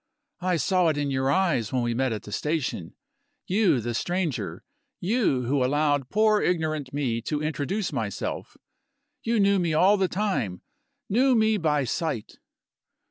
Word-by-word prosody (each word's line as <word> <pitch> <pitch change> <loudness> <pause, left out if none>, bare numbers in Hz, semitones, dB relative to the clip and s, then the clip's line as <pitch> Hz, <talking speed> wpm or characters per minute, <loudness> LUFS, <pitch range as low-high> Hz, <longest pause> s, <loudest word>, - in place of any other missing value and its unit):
"I 180 -1 0
saw 180 +4 +2
it 155 -2 +1
in 145 -1 -1
your 130 0 0
eyes 145 - +1
when 125 -2 0
we 120 0 0
met 130 +1 0
at 110 - -4
the 105 - -10
station. 135 - -2 0.5
You, 185 - +2
the 120 +1 -3
stranger 175 +2 -2 0.4
you 190 - +1
who 130 +2 +1
allowed 145 0 +1
poor 215 0 +3
ignorant 155 -6 -1
me 130 -5 -1
to 150 +6 -3
introduce 160 +5 -2
myself 110 -7 -4 0.6
you 230 -1 0
knew 200 -1 +4
me 170 -3 0
all 195 +6 +5
the 190 -1 +2
time, 180 - -2 0.4
knew 255 +5 +3
me 220 -1 +3
by 150 -5 +1
sight!" 150 - -3
155 Hz, 155 wpm, -26 LUFS, 130-190 Hz, 0.6 s, all